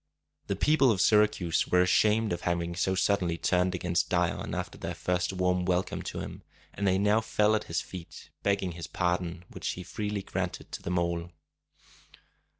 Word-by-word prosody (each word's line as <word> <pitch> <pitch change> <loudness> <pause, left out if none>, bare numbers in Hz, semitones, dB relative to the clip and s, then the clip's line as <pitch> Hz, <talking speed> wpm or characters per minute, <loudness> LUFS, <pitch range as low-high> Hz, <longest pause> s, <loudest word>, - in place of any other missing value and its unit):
The 100 - 0
people 140 +5 +4
of 105 -5 +2
Syracuse 105 -5 +3
were 90 0 +4
ashamed 105 +3 +3
of 85 - -4
having 85 0 -1
so 95 +1 +1
suddenly 90 -3 +1
turned 90 +2 +1
against 85 -1 0
Dion 90 -1 0
after - - -4
their - - -5
first 90 0 -1
warm 90 -1 +1
welcome 90 0 0
to - - -5
him, - - -7 0.3
and 100 - -1
they 95 0 +3
now 105 +3 +3
fell 105 -1 +2
at 105 - -2
his 85 - -1
feet, 85 -4 -10
begging 100 -2 0
his 85 0 -7
pardon, 90 -1 -1
which - - -6
he 90 - -7
freely 105 +2 -3
granted 95 -2 -4
to - - -6
them 90 +1 -2
all. 85 0 -1
90 Hz, 175 wpm, -29 LUFS, 85-100 Hz, 0.3 s, people